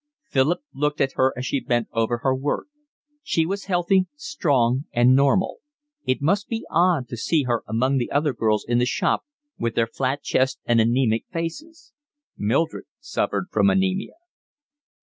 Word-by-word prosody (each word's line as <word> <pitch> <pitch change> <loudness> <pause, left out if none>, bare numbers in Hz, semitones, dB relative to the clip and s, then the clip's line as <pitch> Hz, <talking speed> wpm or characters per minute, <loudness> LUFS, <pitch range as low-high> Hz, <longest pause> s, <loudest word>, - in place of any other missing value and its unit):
Philip 140 - +1
looked 150 +1 -1
at 135 - +2
her 130 0 +2
as 125 - -4
she 140 - 0
bent 120 -2 0
over 115 +1 +1
her 135 - +3
work; 135 +2 -2 0.6
she 165 - 0
was 195 +4 -3
healthy, 185 0 +2
strong, 140 - 0
and 120 +2 +4
normal; 140 +7 +2 0.5
it 130 +2 0
must 200 +7 +1
be 225 -1 -4
odd 170 -6 +2
to - - -5
see 150 +6 +1
her 120 -2 0
among 130 +5 +1
the 120 - -2
other 145 0 +1
girls 110 -3 0
in 120 0 +2
the 125 - +2
shop - - 0 0.3
with 115 -1 -2
their 115 - +3
flat 130 +4 -2
chests 130 0 +1
and 115 -1 +4
anaemic 115 0 +1
faces. 275 - -6 0.4
Mildred 135 +10 0
suffered 290 -9 -2
from 200 - +3
anaemia. 190 0 0
135 Hz, 165 wpm, -23 LUFS, 120-175 Hz, 0.6 s, and